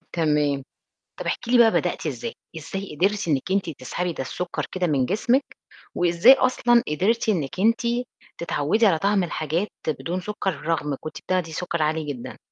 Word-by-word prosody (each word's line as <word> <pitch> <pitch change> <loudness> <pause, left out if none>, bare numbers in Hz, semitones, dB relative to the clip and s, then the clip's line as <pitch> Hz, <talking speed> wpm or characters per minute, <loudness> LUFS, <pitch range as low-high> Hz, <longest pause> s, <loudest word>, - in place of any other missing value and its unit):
تمام. 150 -4 +1 0.6
طَب - - -5
احكي 235 - -2
لي 250 - +5
بقى 225 -2 +7
بدأتِ - - -1
إزاي؟ 470 - -4 0.2
إزاي 195 -6 -6
قدرتِ 195 +1 +1
إنِّك 145 +4 0
أنتِ 195 -4 0
تسحبي 175 +7 -3
ده 135 - -4
السُكّر 180 +7 -4
كده 185 -1 0
من 135 -5 +1
جسمِك، 245 +7 0 0.4
وإزاي 175 +8 +6
أصلًا 240 -2 +3
قدرتِ 210 +10 +1
إنِّك 175 -3 -1
أنتِ 230 +3 +3 0.6
تتعوّدي 170 +7 +1
على 165 -5 +4
طعم 195 0 +2
الحاجات 165 +4 -2 0.2
بدون 165 +6 -2
سُكّر 205 0 -2 0.2
رغم 150 -4 0
كنتِ 155 - -7
بتاخدي 180 -3 -1
سُكّر 170 -1 -2
عالي 155 +1 0
جدًا؟ 125 - -9
175 Hz, 165 wpm, -24 LUFS, 155-210 Hz, 0.6 s, بقى